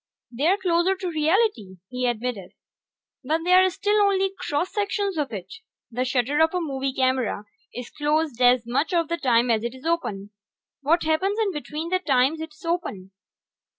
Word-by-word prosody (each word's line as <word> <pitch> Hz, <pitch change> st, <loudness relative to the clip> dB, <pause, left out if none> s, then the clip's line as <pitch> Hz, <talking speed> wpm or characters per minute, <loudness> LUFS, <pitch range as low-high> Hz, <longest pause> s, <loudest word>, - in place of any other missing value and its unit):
"They're 305 Hz, +11 st, +2 dB
closer 365 Hz, 0 st, +2 dB
to 370 Hz, -2 st, -4 dB
reality," 310 Hz, -, +1 dB
he 250 Hz, 0 st, -1 dB
admitted. 235 Hz, -5 st, -3 dB, 0.7 s
"But 315 Hz, +5 st, -1 dB
they 360 Hz, +1 st, +3 dB
are 375 Hz, 0 st, +6 dB
still 415 Hz, +3 st, +1 dB
only 390 Hz, -1 st, +2 dB
cross 320 Hz, +4 st, -2 dB
sections 405 Hz, -2 st, -1 dB
of 295 Hz, -5 st, -2 dB
it. 195 Hz, -5 st, -7 dB, 0.4 s
The 250 Hz, +2 st, -1 dB
shutter 260 Hz, +3 st, 0 dB
of 320 Hz, +2 st, +3 dB
a -, -, +1 dB
movie 275 Hz, -5 st, -2 dB
camera 260 Hz, -5 st, 0 dB, 0.3 s
is 245 Hz, -1 st, -8 dB
closed 295 Hz, -3 st, -1 dB
as 245 Hz, -1 st, +5 dB
much 285 Hz, +9 st, 0 dB
of 335 Hz, -2 st, +1 dB
the 335 Hz, -, -1 dB
time 245 Hz, -4 st, +2 dB
as 220 Hz, -1 st, +1 dB
it 235 Hz, +2 st, -4 dB
is 260 Hz, -, -14 dB
open. 210 Hz, -12 st, -2 dB, 0.5 s
What 325 Hz, +5 st, +2 dB
happens 370 Hz, +6 st, +1 dB
in 425 Hz, -3 st, +1 dB
between 305 Hz, 0 st, -5 dB
the 370 Hz, +1 st, +1 dB
times 280 Hz, -1 st, +2 dB
it's 320 Hz, 0 st, -9 dB
open? 270 Hz, -, -3 dB
305 Hz, 175 wpm, -24 LUFS, 250-360 Hz, 0.7 s, are